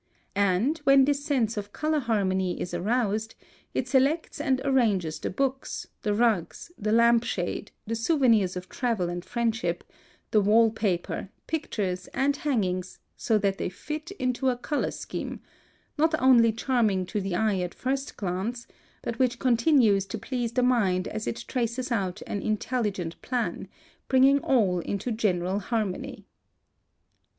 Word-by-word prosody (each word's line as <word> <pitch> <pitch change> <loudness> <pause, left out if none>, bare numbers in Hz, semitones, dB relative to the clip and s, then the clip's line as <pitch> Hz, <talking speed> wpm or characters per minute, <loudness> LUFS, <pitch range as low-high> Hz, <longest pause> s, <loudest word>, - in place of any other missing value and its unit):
And, 200 - +2
when 275 -2 +5
this 285 0 0
sense 245 -8 0
of 205 0 -5
color 310 0 0
harmony 190 -7 0
is 175 - -4
aroused, 215 +3 0 0.4
it 255 - 0
selects 285 +4 +1
and 265 -4 +1
arranges 210 - +1
the - - -3
books, 270 +5 -2 0.2
the 210 - 0
rugs, 225 - 0
the 215 - -2
lamp 235 +1 +5
shade, 180 -1 -3 0.2
the 225 - -3
souvenirs 230 - +3
of 180 0 -6
travel 225 -8 -1
and 175 0 -4
friendship, 235 0 -1 0.5
the 215 - +4
wall 220 +3 +5
paper, 195 -4 -2 0.2
pictures, 200 - -2
and 280 +1 +1
hangings, 185 -11 -1 0.2
so 220 - +1
that 200 -2 0
they - - -1
fit 305 - -6
into 255 0 0
a 250 - 0
color 290 +4 -1
scheme, - - -6 0.6
not 315 0 +3
only 240 -3 +6
charming 220 -5 +1
to 200 +3 -3
the 190 -2 -2
eye 210 -1 +1
at 180 -1 -3
first 270 +1 -3
glance, 205 +6 -3 0.4
but 230 - -4
which 250 -2 +2
continues 235 -5 +3
to 225 - -4
please 240 +1 -3
the 250 - +2
mind 200 -8 +2
as 215 0 -5
it 235 +1 -4
traces 245 +1 -2
out 195 -4 -1
an 200 - -3
intelligent 210 -6 -2
plan, 245 -2 -2 0.4
bringing 270 +2 +5
all 210 -11 +2
into 200 +7 -3
general 190 -3 0
harmony. 210 -3 -3
225 Hz, 150 wpm, -27 LUFS, 195-260 Hz, 0.6 s, only